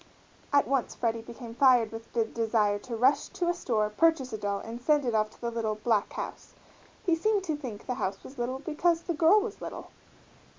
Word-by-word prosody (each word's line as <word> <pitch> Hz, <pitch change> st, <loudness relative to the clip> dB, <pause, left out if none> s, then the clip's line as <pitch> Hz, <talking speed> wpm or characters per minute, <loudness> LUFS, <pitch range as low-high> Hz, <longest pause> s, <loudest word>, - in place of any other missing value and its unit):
At 285 Hz, 0 st, +4 dB
once 270 Hz, -2 st, 0 dB
Freddie 230 Hz, -1 st, -1 dB
became 230 Hz, 0 st, -9 dB
fired 245 Hz, -3 st, +5 dB
with 225 Hz, 0 st, -9 dB
the 230 Hz, -2 st, +2 dB
desire 220 Hz, -2 st, +1 dB
to 235 Hz, +3 st, -6 dB
rush 265 Hz, +5 st, +3 dB
to 360 Hz, -2 st, -2 dB
a -, -, +3 dB
store, 225 Hz, -11 st, 0 dB
purchase 275 Hz, -1 st, +2 dB
a -, -, -2 dB
doll, 200 Hz, -1 st, -1 dB
and 230 Hz, +3 st, -7 dB
send 295 Hz, +1 st, +3 dB
it 240 Hz, -, 0 dB
off 215 Hz, -1 st, +2 dB
to -, -, -21 dB
the 235 Hz, -1 st, -2 dB
little 225 Hz, -2 st, -1 dB
"black 215 Hz, -1 st, +1 dB
house." -, -, -7 dB, 0.5 s
He 345 Hz, -3 st, +3 dB
seemed 410 Hz, +3 st, +1 dB
to 320 Hz, -5 st, -1 dB
think 250 Hz, -8 st, -7 dB
the 250 Hz, -, -1 dB
house 195 Hz, +1 st, -2 dB
was 270 Hz, -1 st, -11 dB
little 250 Hz, +2 st, -1 dB
because 330 Hz, +4 st, 0 dB
the 340 Hz, -, -2 dB
girl 330 Hz, +6 st, +5 dB
was 430 Hz, -1 st, -6 dB
little. -, -, -7 dB
245 Hz, 215 wpm, -29 LUFS, 225-305 Hz, 0.5 s, fired